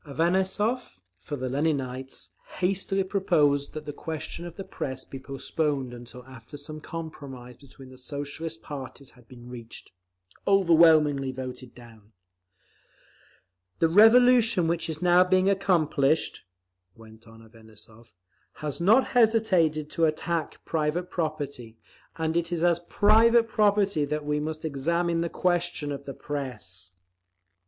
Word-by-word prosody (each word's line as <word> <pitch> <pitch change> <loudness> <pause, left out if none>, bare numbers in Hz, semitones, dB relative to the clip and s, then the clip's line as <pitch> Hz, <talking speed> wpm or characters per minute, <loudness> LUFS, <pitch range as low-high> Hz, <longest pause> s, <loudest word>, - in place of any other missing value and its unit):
Avanessov, 190 - 0 0.2
for 145 - -6
the 130 -2 -4
Leninites, 135 -2 -2 0.3
hastily 195 +1 0
proposed 150 -7 +1
that 155 -1 -7
the 145 - -5
question 160 +3 -6
of 170 - -11
the 195 - -6
Press 130 -7 -6
be 135 - -9
postponed 135 0 -3
until 120 +1 -11
after 130 +1 -12
some 155 +2 -8
compromise 140 -7 -8
between 135 0 -15
the 130 0 -14
Socialist 145 +4 -6
parties 140 -2 -8
had 125 -2 -22
been 120 -1 -13
reached. 120 -2 -10 0.6
Overwhelmingly 160 -7 +4
voted 130 -1 -8
down. 115 -3 -16 1.6
"The 165 - +2
revolution 225 -1 +6
which 170 0 -1
is 155 +1 -4
now 180 0 +6
being 185 +1 +2
accomplished," 160 - +1 0.5
went 110 0 -16
on 115 0 -15
Avanessov, 110 0 -13 0.4
"has 150 +1 -5
not 220 +9 +4
hesitated 190 - +2
to 165 - +2
attack 160 +1 -2
private 160 +3 -1
property; 145 -8 -4 0.4
and 160 0 -2
it 170 0 -1
is 170 -1 -1
as 175 -1 +3
private 225 +3 +5
property 205 -7 +2
that 150 +1 -3
we 150 0 0
must 155 +1 -4
examine 165 +4 0
the 170 - -1
question 175 -5 -1
of 140 0 -6
the 135 - -7
Press…." 110 -11 -5
155 Hz, 130 wpm, -26 LUFS, 130-175 Hz, 1.6 s, revolution